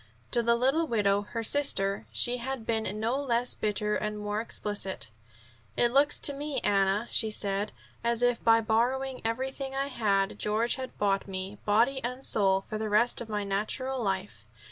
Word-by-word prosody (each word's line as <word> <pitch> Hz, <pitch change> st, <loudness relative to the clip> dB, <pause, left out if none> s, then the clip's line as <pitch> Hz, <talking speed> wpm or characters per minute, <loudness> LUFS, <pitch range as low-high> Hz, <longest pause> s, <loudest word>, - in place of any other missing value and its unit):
To 240 Hz, -, +3 dB
the 235 Hz, 0 st, +3 dB
little 270 Hz, +7 st, +2 dB
widow, 205 Hz, -4 st, +2 dB
her 230 Hz, +3 st, -5 dB
sister, 205 Hz, -7 st, +2 dB
she 245 Hz, +1 st, +3 dB
had 250 Hz, -1 st, -5 dB
been 220 Hz, -2 st, -1 dB
no 235 Hz, +6 st, 0 dB
less 245 Hz, -2 st, +1 dB
bitter, 210 Hz, 0 st, -1 dB
and 210 Hz, 0 st, -3 dB
more 210 Hz, +1 st, -2 dB
explicit. 205 Hz, -, -3 dB, 0.7 s
"It 240 Hz, -, +3 dB
looks 280 Hz, +3 st, +4 dB
to 285 Hz, -, +3 dB
me, 285 Hz, -1 st, -2 dB
Anna," 200 Hz, +2 st, +1 dB
she 220 Hz, -, +3 dB
said, 200 Hz, -1 st, -1 dB, 0.3 s
"as 235 Hz, 0 st, +1 dB
if 245 Hz, -1 st, +2 dB
by 225 Hz, 0 st, +5 dB
borrowing 250 Hz, +4 st, 0 dB
everything 265 Hz, +4 st, -3 dB
I 275 Hz, +1 st, -1 dB
had 200 Hz, -6 st, 0 dB
George 220 Hz, +3 st, +1 dB
had 260 Hz, -1 st, -6 dB
bought 195 Hz, -1 st, 0 dB
me, 190 Hz, +1 st, -5 dB
body 235 Hz, +6 st, +2 dB
and 250 Hz, +3 st, -4 dB
soul, 195 Hz, -2 st, +3 dB
for 215 Hz, -, -4 dB
the 215 Hz, 0 st, -2 dB
rest 225 Hz, +4 st, +3 dB
of 230 Hz, -, -7 dB
my 210 Hz, -1 st, -2 dB
natural 220 Hz, +7 st, -2 dB
life. 195 Hz, -2 st, -3 dB
225 Hz, 175 wpm, -28 LUFS, 205-255 Hz, 0.7 s, by